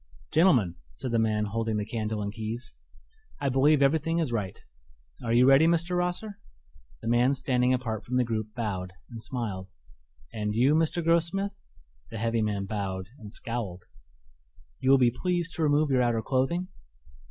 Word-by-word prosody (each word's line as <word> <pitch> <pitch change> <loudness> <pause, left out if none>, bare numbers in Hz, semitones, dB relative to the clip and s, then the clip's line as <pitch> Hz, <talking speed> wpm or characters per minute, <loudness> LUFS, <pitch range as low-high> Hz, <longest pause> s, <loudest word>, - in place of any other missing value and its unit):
"Gentlemen," 130 - +4 0.2
said 125 - -5
the 115 - +2
man 110 -1 +1
holding 110 +1 -1
the 105 - -2
candle 110 -1 -3
and 100 0 -4
keys, 115 +2 -5 0.7
"I 140 - 0
believe 140 +2 +4
everything 160 +4 +2
is 160 -7 0
right. 105 -5 -3 0.6
Are 115 - -2
you 120 +2 +5
ready, 135 +4 +6
Mr. 170 +1 +1
Rosser?" 180 +4 -2 0.6
The - - -4
man 120 +4 +3
standing 125 -1 +1
apart 115 -4 -1
from 125 - -4
the 125 - +4
group 110 -2 -3
bowed 95 -6 -3 0.2
and 115 -1 -7
smiled. 105 -7 -4 0.6
"And 105 -1 -2
you, 130 +6 +4
Mr. 165 +2 +1
Grossmith?" 170 +4 +2 0.6
The - - -6
heavy 115 +1 0
man 105 -2 -1
bowed 95 -2 -4
and 105 -3 -10
scowled. 110 -7 -4 0.9
"You 130 - 0
will 135 - +8
be 125 -2 +4
pleased 175 +5 -1
to - - -4
remove 150 -1 +3
your 130 -1 +3
outer 120 -2 +1
clothing." 170 +8 0
120 Hz, 165 wpm, -28 LUFS, 110-150 Hz, 0.9 s, will